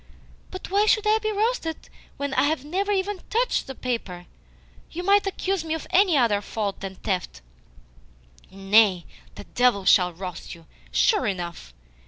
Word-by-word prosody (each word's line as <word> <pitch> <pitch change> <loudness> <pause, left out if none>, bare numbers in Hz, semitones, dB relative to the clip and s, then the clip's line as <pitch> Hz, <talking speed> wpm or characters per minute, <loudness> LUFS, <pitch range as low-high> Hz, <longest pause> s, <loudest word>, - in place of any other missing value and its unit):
"But 370 -1 -8
why 410 +2 +3
should 430 0 +3
I 430 +1 +3
be 435 0 -1
roasted 420 -6 -2 0.3
when 280 -1 -3
I - - +3
have 290 -2 -1
never 390 +6 -1
even 395 0 -1
TOUCHED 480 +3 0
the 265 - -7
paper? 205 -9 -4 0.6
You 355 - -6
might 400 +1 +3
accuse 385 -2 -2
me 320 -1 -2
of 320 - -7
any 370 -5 +4
other 220 -6 +2
fault 205 -1 -4
than 195 -1 -7
theft." 180 - -4 1.1
"Nay, 195 -1 +3 0.5
devils 245 -6 +3
shall 180 -2 +5
roast 180 0 -8
you, 165 -1 -18 0.3
sure 420 - +2
enough. 170 - -5
270 Hz, 155 wpm, -24 LUFS, -, 1.1 s, shall